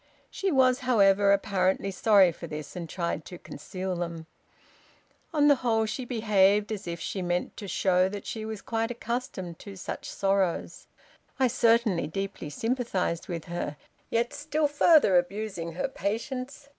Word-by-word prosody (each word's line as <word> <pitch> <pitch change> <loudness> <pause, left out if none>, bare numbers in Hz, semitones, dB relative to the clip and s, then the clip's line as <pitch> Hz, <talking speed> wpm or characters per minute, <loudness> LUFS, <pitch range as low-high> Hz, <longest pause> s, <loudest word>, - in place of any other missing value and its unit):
She 390 -1 -1
was, 255 -3 +4
however, 200 -6 +4
apparently 195 -1 +1
sorry 195 -1 +5
for 170 +1 -9
this, 150 -2 -7
and 170 -2 -6
tried 170 -3 -2
to 180 - -9
conceal 185 +1 -5
them. 170 -2 -4 1.1
On 295 -3 +3
the 285 -2 +6
whole 225 -3 +1
she 245 +4 -4
behaved 210 -3 +3
as 210 -3 -5
if 170 0 -4
she 190 - -4
meant 175 0 -2
to 205 - -7
show 185 0 +2
that 205 0 -7
she 220 - -5
was 220 -1 -6
quite 225 0 -1
accustomed 235 -8 -4
to 200 -1 -9
such 190 - -6
sorrows. 195 -3 -1 0.5
I 260 - +4
certainly 225 -9 +2
deeply 195 -1 -5
sympathized 225 - -2
with 170 -3 -5
her, 170 -4 -4 0.3
yet 235 +1 0
still 300 +1 0
further 290 - +5
abusing 180 -2 -4
her 175 - -1
patience. 255 +8 -4
200 Hz, 155 wpm, -28 LUFS, 180-235 Hz, 1.1 s, the